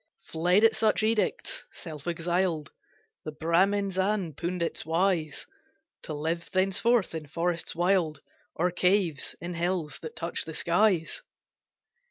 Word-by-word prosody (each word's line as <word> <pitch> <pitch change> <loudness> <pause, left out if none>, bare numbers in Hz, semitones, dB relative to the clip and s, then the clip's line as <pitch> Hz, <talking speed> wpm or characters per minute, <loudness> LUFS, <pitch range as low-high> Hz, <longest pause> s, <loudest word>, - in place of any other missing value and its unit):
Fled 180 +6 +2
at 225 - +5
such 215 -1 +2
edicts, 225 - 0
self 155 -2 -9
exiled, 170 -2 -1 0.5
The 155 - -5
Bramins 190 +5 +1
and 190 -3 +1
the - - -22
pundits 170 -1 -2
wise, 165 -2 0 0.6
To 155 - -5
live 165 +3 -2
thenceforth 195 +3 +2
in 160 -2 -5
forests 170 +3 -1
wild, 175 -4 +1 0.4
Or 180 +2 +1
caves 180 -4 +1
in 175 +1 -5
hills 170 -3 -2
that 160 - -8
touch 170 +1 -3
the 160 - -7
skies. 175 -1 +2
175 Hz, 130 wpm, -28 LUFS, 160-190 Hz, 0.6 s, at